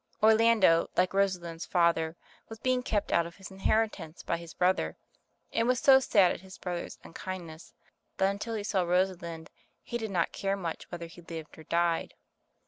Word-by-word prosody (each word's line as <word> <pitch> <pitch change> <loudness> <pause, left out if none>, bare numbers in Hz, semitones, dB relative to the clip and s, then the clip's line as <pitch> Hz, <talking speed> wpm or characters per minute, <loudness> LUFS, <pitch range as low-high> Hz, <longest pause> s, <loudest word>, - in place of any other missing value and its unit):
Orlando, 220 -6 +5
like 180 +1 +3
Rosalind's 180 -4 -1
father, 170 -2 +2 0.3
was 225 - -8
beinor 255 +2 0
kept 210 -4 -1
out 170 0 +3
of 170 - -13
his 195 - -10
inheri 210 +3 +2
tance 165 -3 -10
by - - -1
his 170 -1 -11
brother, 185 +1 +1 0.6
and 230 +1 +2
was 250 -1 +2
so 265 -1 +7
sad 200 -8 +4
at - - -5
his 190 0 -12
brother's 175 -2 -5
unkindness 170 -2 -8 0.4
that 190 +1 +3
until 215 +3 -4
he 210 - -3
saw 200 -2 +1
Rosalind, 175 -2 -1 0.3
he 240 - -4
did 220 -1 -3
not 175 -4 0
care 195 0 -1
much 170 -4 -5
whether 170 -1 -5
he 170 +1 -12
lived 165 -2 -8
or 160 - -13
died. 170 -1 0
185 Hz, 180 wpm, -30 LUFS, 170-205 Hz, 0.6 s, so